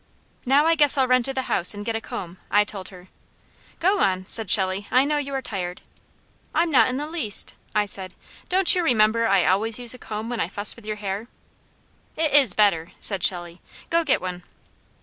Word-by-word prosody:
"Now, 280 Hz, +4 st, +3 dB
I 330 Hz, -, +3 dB
guess 295 Hz, -3 st, +4 dB
I'll 265 Hz, -1 st, +2 dB
run 255 Hz, 0 st, +3 dB
to 270 Hz, -, -4 dB
the 260 Hz, 0 st, -3 dB
house 185 Hz, -4 st, +1 dB
and 205 Hz, 0 st, -8 dB
get 230 Hz, 0 st, -3 dB
a 225 Hz, -, -3 dB
comb," 180 Hz, -4 st, -8 dB
I 205 Hz, +1 st, +3 dB
told 200 Hz, -3 st, -7 dB
her. 185 Hz, -1 st, -15 dB, 0.7 s
"Go 390 Hz, +4 st, +1 dB
on," 185 Hz, 0 st, 0 dB
said 220 Hz, 0 st, +4 dB
Shelley. 190 Hz, +1 st, 0 dB
"I 255 Hz, +2 st, +3 dB
know 295 Hz, 0 st, -1 dB
you 280 Hz, -1 st, -6 dB
are 265 Hz, -, -4 dB
tired." 180 Hz, -5 st, -6 dB, 0.7 s
"I'm 335 Hz, 0 st, +1 dB
not 270 Hz, -, +4 dB
in 255 Hz, -, -3 dB
the 295 Hz, -, -4 dB
least," 305 Hz, -, -3 dB, 0.2 s
I 210 Hz, 0 st, +2 dB
said. 190 Hz, -2 st, -2 dB, 0.3 s
"Don't 370 Hz, 0 st, +5 dB
you 360 Hz, -, +1 dB
remember 230 Hz, -5 st, +2 dB
I 195 Hz, -3 st, +2 dB
always 210 Hz, +4 st, 0 dB
use 245 Hz, -1 st, +7 dB
a 250 Hz, -, -12 dB
comb 215 Hz, 0 st, -7 dB
when 240 Hz, -1 st, -5 dB
I -, -, -1 dB
fuss 205 Hz, +1 st, +2 dB
with 230 Hz, -3 st, -15 dB
your 215 Hz, -, -3 dB
hair?" 205 Hz, +1 st, -6 dB, 0.9 s
"It 315 Hz, -2 st, -1 dB
is 270 Hz, -10 st, +4 dB
better," 180 Hz, -6 st, +1 dB
said 195 Hz, -4 st, -2 dB
Shelley. 175 Hz, -1 st, -1 dB, 0.3 s
"Go 335 Hz, 0 st, +2 dB
get 290 Hz, -, 0 dB
one." 180 Hz, -1 st, -6 dB
215 Hz, 210 wpm, -22 LUFS, 190-270 Hz, 0.9 s, use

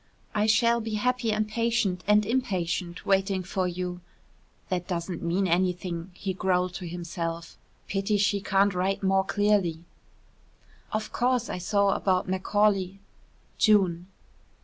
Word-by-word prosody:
I 210 Hz, +1 st, +1 dB
shall 235 Hz, +2 st, +3 dB
be 220 Hz, -1 st, -3 dB
happy 245 Hz, +1 st, 0 dB
and 215 Hz, 0 st, 0 dB
patient 225 Hz, -4 st, 0 dB
and 210 Hz, 0 st, +4 dB
impatient 185 Hz, -7 st, -2 dB
waiting 195 Hz, -1 st, +1 dB
for 185 Hz, 0 st, -1 dB
you." 180 Hz, 0 st, -4 dB, 0.7 s
("That 180 Hz, -1 st, -2 dB
doesn't 170 Hz, -1 st, -3 dB
mean 180 Hz, +3 st, 0 dB
anything," 175 Hz, 0 st, -1 dB
he 190 Hz, 0 st, -3 dB
growled 180 Hz, -1 st, 0 dB
to 180 Hz, -, -7 dB
himself. 170 Hz, -1 st, -5 dB, 0.3 s
"Pity 200 Hz, +1 st, 0 dB
she 200 Hz, 0 st, +1 dB
can't 195 Hz, 0 st, +2 dB
write 190 Hz, +2 st, -1 dB
more 190 Hz, 0 st, +3 dB
clearly.") 195 Hz, -5 st, +1 dB, 1.1 s
"Of 215 Hz, 0 st, -3 dB
course 250 Hz, -1 st, 0 dB
I -, -, -4 dB
saw 200 Hz, +2 st, +2 dB
about 185 Hz, -2 st, +1 dB
Macaulay. 195 Hz, 0 st, +1 dB, 0.6 s
June." 185 Hz, -5 st, +3 dB
190 Hz, 130 wpm, -27 LUFS, 180-210 Hz, 1.1 s, and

